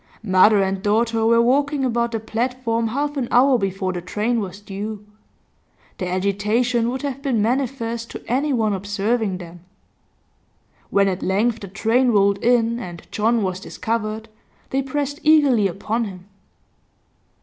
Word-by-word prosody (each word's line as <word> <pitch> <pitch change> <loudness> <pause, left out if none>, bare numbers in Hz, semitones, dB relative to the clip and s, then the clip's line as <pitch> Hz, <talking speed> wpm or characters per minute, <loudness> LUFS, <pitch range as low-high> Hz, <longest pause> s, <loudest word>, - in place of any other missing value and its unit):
Mother 195 +1 +5
and 190 0 -2
daughter 225 +2 +1
were 230 0 +5
walking 280 +2 +1
about 235 -1 0
the 225 - -2
platform 230 +1 -1
half 285 +5 -2
an 255 -3 -1
hour 255 +1 +4
before 195 -1 -2
the 175 - -4
train 215 +6 -1
was 195 -2 -5
due; 205 +1 -6 0.9
their 180 -1 -3
agitation 210 +6 +1
would 260 +3 -4
have 275 -1 -4
been 265 -6 0
manifest 235 0 -1
to - - -8
anyone 250 -4 +1
observing 200 +1 -1
them. 175 -1 -10 1.3
When 200 0 +3
at 185 -1 -2
length 220 +5 +1
the 200 - -8
train 225 +7 +1
rolled 200 -2 +3
in 235 0 +2
and 175 -7 -8
John 225 +1 +1
was 185 -1 -2
discovered, 220 +1 -3 0.4
they 270 - +1
pressed 285 +1 -3
eagerly 285 -9 +4
upon 215 +5 -2
him. 185 -3 -9
225 Hz, 145 wpm, -21 LUFS, 200-245 Hz, 1.3 s, Mother